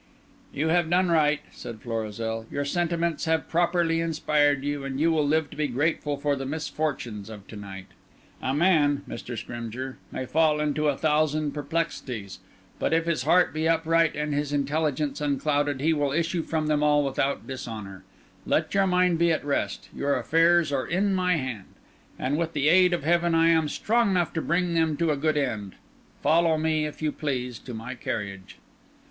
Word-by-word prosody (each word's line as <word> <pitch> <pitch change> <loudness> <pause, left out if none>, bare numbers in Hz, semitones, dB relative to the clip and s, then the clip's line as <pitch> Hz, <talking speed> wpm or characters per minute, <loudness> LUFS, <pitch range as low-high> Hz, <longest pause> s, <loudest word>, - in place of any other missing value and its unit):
"You 155 +3 -1
have 170 -1 +2
done 180 0 +3
right," 150 -2 +3
said 115 -2 -9
Florizel, 115 0 -4
"your 145 0 -2
sentiments 170 +1 -1
have 160 -1 0
properly 170 -1 +1
inspired 150 -3 +1
you, 145 -1 -2
and 135 0 -4
you 165 +2 +3
will 155 -2 +2
live 155 0 +1
to - - -10
be 150 0 0
grateful 145 +2 -1
for 145 0 0
the 135 - -5
misfortunes 140 -8 -3
of 105 -3 -10
to - - -9
night. 95 -2 -8 0.6
A 130 - -1
man, 145 -2 +3
Mr. 120 0 -6
Scrymgeour, 120 +3 -6
may 130 - -4
fall 155 +2 +2
into 150 0 0
a 140 -2 +1
thousand 155 -1 +1
perplexities, 140 - -4 0.4
but - - 0
if 165 0 +2
his 170 -5 0
heart 175 +3 +4
be 160 +1 0
upright 165 0 +2
and 150 0 -2
his 145 0 -1
intelligence 145 0 -1
unclouded, 145 -1 0
he 160 +3 +3
will 145 -2 0
issue 170 +2 0
from 160 -1 -2
them 150 -1 +1
all 150 -1 +3
without 135 0 -1
dishonour. 110 -7 -7 0.4
Let - - +1
your 195 -1 +3
mind 180 -2 +2
be 170 0 +4
at 155 - -1
rest; 140 -1 -2
your 140 0 0
affairs 165 -1 +3
are 135 -2 -1
in 195 +3 +1
my 180 -1 +2
hand; 125 -9 -4 0.5
and 145 +4 -1
with 165 -1 -2
the 145 0 +2
aid 180 +1 +5
of 170 - -1
heaven 170 +1 +2
I 165 0 +5
am 160 -2 +3
strong 230 +6 +1
enough 180 -3 +1
to 160 - -1
bring 175 +2 0
them 160 -2 +1
to 170 -2 +1
a - - +1
good 155 +2 0
end. 110 -9 -2 0.5
Follow 165 0 +3
me, 155 -1 +1
if 150 - -9
you 155 - +1
please, 125 -6 -3
to 125 - -8
my 115 +3 -6
carriage." 100 -5 -5
150 Hz, 185 wpm, -26 LUFS, 135-165 Hz, 0.6 s, aid